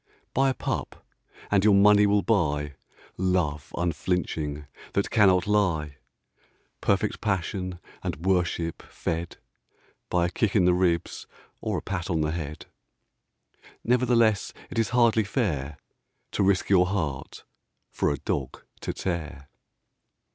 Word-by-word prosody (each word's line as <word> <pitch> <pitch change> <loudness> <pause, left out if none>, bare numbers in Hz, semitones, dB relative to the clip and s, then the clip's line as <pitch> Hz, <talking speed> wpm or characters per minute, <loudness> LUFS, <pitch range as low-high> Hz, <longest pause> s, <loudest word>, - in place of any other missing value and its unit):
Buy 135 +1 +3
a 130 - -1
pup - - -4 0.5
and 100 -2 +4
your 105 -1 +6
money 105 +1 +6
will 100 0 +3
buy 75 -9 +1 0.4
Love 90 -5 0
unflinching 80 -3 -2 0.3
that 100 - 0
cannot 95 -5 +4
lie 85 -9 +1 0.8
Perfect 100 +2 0
passion 95 -2 -2 0.2
and - - -3
worship 85 -3 0
fed 85 +1 -4 0.7
By 90 -1 +2
a 85 - -2
kick 105 +3 0
in 95 -4 +5
the 90 - +5
ribs 90 -2 0 0.3
or - - -2
a - - -5
pat 95 -2 -4
on 80 -3 +1
the 75 0 0
head. 75 -2 -5 1.2
Nevertheless 115 -4 +2 0.2
it - - -2
is 115 - +1
hardly 115 -2 +4
fair 75 - -2 0.5
To - - -1
risk 95 -1 +2
your 90 -2 +4
heart 80 -9 -3 0.5
for - - 0
a 70 - -1
dog 65 0 -4 0.2
to - - -4
tear. 75 -6 -4
90 Hz, 130 wpm, -26 LUFS, 80-105 Hz, 1.2 s, your